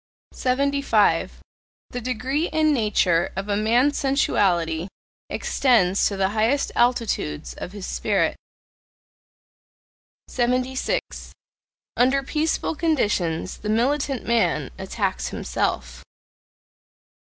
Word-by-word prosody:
75. 275 -4 +1 0.5
The 245 - -4
degree 255 +7 -1
and 310 -1 +2
nature 200 -8 +2
of 195 +1 -4
a 205 - 0
man's 240 +7 +2
sensuality 180 - +1 0.4
extends 205 -8 +2
to 200 - -3
the 190 0 +1
highest 225 +7 +1
altitudes 230 - 0
of 180 - -8
his 200 -3 -7
spirit. - - 0 1.9
76. 255 - -2 0.6
Under 265 +3 +3
peaceful 310 +4 -1
conditions 210 - 0
the 210 - -5
militant 265 +3 0
man 235 -1 +1
attacks - - -2
himself. 65 +1 -3
240 Hz, 90 wpm, -23 LUFS, 195-275 Hz, 1.9 s, Under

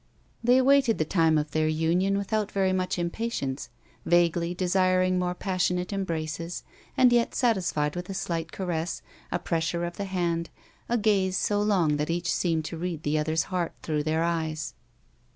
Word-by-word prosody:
They 245 +2 +5
awaited 265 -3 +4
the 155 - +1
time 160 -2 +3
of 150 0 -1
their 155 0 +1
union 170 +5 +1
without 210 +1 -1
very 190 -1 +1
much 185 0 -1
impatience, 170 - -3 0.3
vaguely 175 0 +2
desiring 185 0 +2
more 180 0 -1
passionate 180 0 -1
embraces, 165 -3 -3 0.3
and 250 -1 +6
yet 235 -1 +2
satisfied 180 - +1
with 180 +1 -5
a 195 - -4
slight 165 -3 -3
caress, 175 -3 -3 0.3
a - - +1
pressure 170 +1 -1
of 175 0 -6
the 200 - -3
hand, 170 -3 -1 0.4
a 240 - +2
gaze 195 -4 +2
so 205 0 +1
long 180 -8 +2
that 150 +2 -2
each 175 +1 0
seemed 165 -3 0
to 165 - -5
read 170 -2 -4
the 150 +1 +1
other's 155 +1 +1
heart 175 -2 -1
through 155 -2 0
their 160 +2 0
eyes. 160 -4 -2
175 Hz, 170 wpm, -27 LUFS, 160-190 Hz, 0.4 s, and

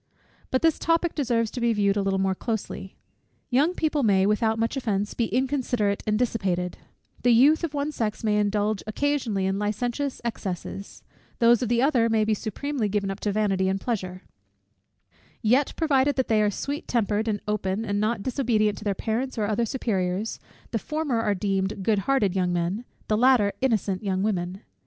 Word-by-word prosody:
But 260 - 0
this 325 -2 +3
topic 330 +1 +1
deserves 235 -6 0
to 250 - -5
be 235 -1 +3
viewed 200 -2 +2
a 205 - +1
little 195 0 0
more 190 0 +1
closely. 195 -2 -4 0.6
Young 295 +8 +3
people 305 -2 0
may, 195 -5 +3
without 220 +2 +2
much 230 +4 0
offence, 210 -6 -1
be 235 - 0
inconsiderate 245 -4 0
and 210 0 +2
dissipated; 190 -7 -1 0.4
the 245 - +3
youth 275 +8 +5
of 310 -3 -2
one 285 +1 -1
sex 220 -7 -3
may 210 -1 +2
indulge 210 0 0
occasionally 230 -5 0
in 190 +1 0
licentious 240 +6 -2
excesses; 195 -3 -5 0.3
those 235 0 +5
of 245 - -1
the 240 +1 +2
other 245 -5 +3
may 220 -1 +2
be 220 - +2
supremely 220 +3 -2
given 200 -1 -1
up 195 - -6
to 210 - -1
vanity 195 -2 +1
and 195 +1 0
pleasure: 185 -5 -4 1.2
yet, 255 +6 +3
provided 285 -3 +2
that 260 - -1
they 220 -1 +4
are 210 - +3
sweet 285 +8 -4
tempered, 220 -2 0
and 210 -2 0
open, 210 0 -1
and 205 -1 -1
not 215 0 0
disobedient 225 -6 +1
to - - -10
their 200 -2 0
parents 235 +6 -2
or 215 - +1
other 220 +2 0
superiors, 200 -4 -2 0.3
the 225 - 0
former 295 -3 -1
are 205 -2 +1
deemed 195 0 -1
good 210 0 +2
hearted 215 -9 +2
young 180 -2 +1
men, 175 +7 -1 0.2
the 215 - +2
latter, 235 -3 +4
innocent 215 -6 0
young 190 -1 0
women. 190 -2 -2
215 Hz, 185 wpm, -25 LUFS, 200-250 Hz, 1.2 s, youth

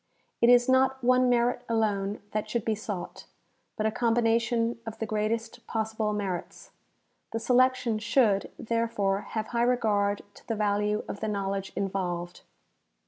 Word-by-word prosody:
It 235 - +6
is 245 0 +6
not 265 0 +3
one 255 +1 +4
merit 245 0 +2
alone 205 -3 0
that 215 0 -2
should 235 0 -2
be 220 - +1
sought, 205 -4 -6 0.5
but 215 - -1
a 220 - +2
combination 230 0 +1
of 225 -1 -7
the 225 - -2
greatest 225 +2 -2
possible 220 -1 -1
merits. 195 -4 -4 0.6
The 225 - -1
selection 250 -2 +2
should, 215 -3 +2
therefore, 225 -4 0
have 220 -1 -2
high 235 -1 0
regard 210 -5 +1
to - - -18
the 225 - -1
value 210 0 0
of 200 - -5
the 220 - -2
knowledge 195 -1 -2
involved. 180 -3 -3
220 Hz, 145 wpm, -28 LUFS, 205-235 Hz, 0.6 s, It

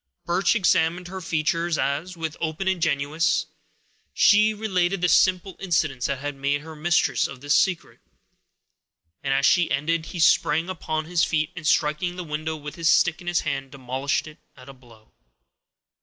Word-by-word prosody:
Birch 185 +6 +1
examined 175 -3 +1
her 190 0 -7
features 165 0 -1
as, 160 +6 -2
with 160 -2 -4
open 165 +4 -3
ingenuousness, 160 -3 0 0.7
she 210 +1 +5
related 195 -3 -1
the 180 - +1
simple 185 +1 +2
incidents 155 -9 0
that 140 - -2
had 145 +2 -5
made 140 +1 -1
her 160 +1 -10
mistress 165 +2 +1
of 135 0 -11
his 145 0 +1
secret; 180 +3 0 1.2
and, 135 - -2
as 135 +1 +2
she 175 +1 +3
ended, 160 +2 -1
he 175 - -7
sprang 160 +1 +3
upon 155 -3 -3
his 170 0 +1
feet, 155 -1 0
and, 165 -3 -5
striking 160 +3 +1
the 180 - -5
window 155 0 -4
with 150 +1 -9
the 165 - -9
stick 165 +1 +3
in 175 - -13
his 175 -1 +1
hand, 135 -1 -3
demolished 135 +1 -2
it 155 -1 -13 0.2
at 130 0 -14
a 135 - -10
blow. 115 -4 -20
160 Hz, 170 wpm, -24 LUFS, 145-175 Hz, 1.2 s, she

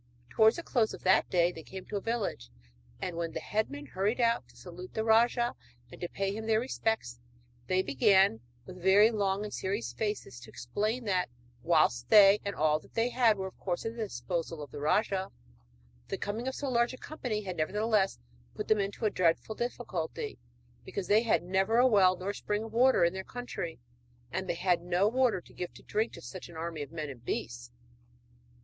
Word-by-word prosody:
Towards 220 0 +5
the 340 - -5
close 230 -8 +1
of - - -16
that 185 +1 +4
day 175 -1 +3
they 165 - -9
came 190 +3 -9
to - - -6
a 200 - -1
village, 215 - -3 0.5
and 175 -2 -4
when 170 -1 -3
the - - -3
headmen 175 -10 -2
hurried 200 - -1
out 235 -1 +2
to - - -21
salute 180 0 -10
the 220 - 0
rajah 235 +2 +3 0.4
and - - -12
to 175 - -3
pay 195 0 -2
him 220 0 -5
their 220 -1 +3
respects, 225 - -2 0.5
they 185 0 +2
began, 140 - +4 0.2
with 185 -1 -10
very 200 +5 +6
long 200 -2 0
and 210 - -6
serious 200 +4 -3
faces, 210 - -3
to 120 -2 -13
explain 215 - -2
that, 185 -4 0 0.3
whilst 125 -7 +2
they 205 -1 +8
and 200 0 -3
all 155 0 +2
that - - -21
they 230 +2 +2
had 235 -4 +3
were 190 - -3
of 190 - -9
course 175 +1 -3
at 225 +1 -3
the 235 - -5
disposal 170 -5 -4
of 145 - -11
the - - -7
rajah, 190 +5 +1 0.8
the - - -3
coming 220 +5 -4
of 265 - -2
so 285 - -4
large 240 -1 +1
a - - -15
company 245 -9 -4
had 185 -2 -5
nevertheless 205 +5 +1 0.4
put - - -4
them 215 - +4
into 200 +3 -2
a 210 - +2
dreadful 175 +4 +1
difficulty 215 - -4 0.4
because 195 - -4
they 210 +2 +6
had 230 -6 +2
never 190 +5 +1
a 245 - +6
well 190 -6 +5
nor 195 +3 -3
spring 210 +1 -2
of 225 -1 -9
water 250 -5 +5
in 170 - +1
their 190 0 -5
country; 210 - -6 0.5
and 190 +2 -3
they - - 0
had 180 -1 +1
no 180 +3 +2
water 250 -2 +2
to - - -18
give 180 - -5
drink 220 +2 -2
to - - -11
such 185 -2 -8
an 170 - -12
army 165 -1 -4
of 140 - -6
men 155 -2 -4
and 120 -3 -13
beasts! 120 0 -4
195 Hz, 205 wpm, -30 LUFS, 170-220 Hz, 0.8 s, they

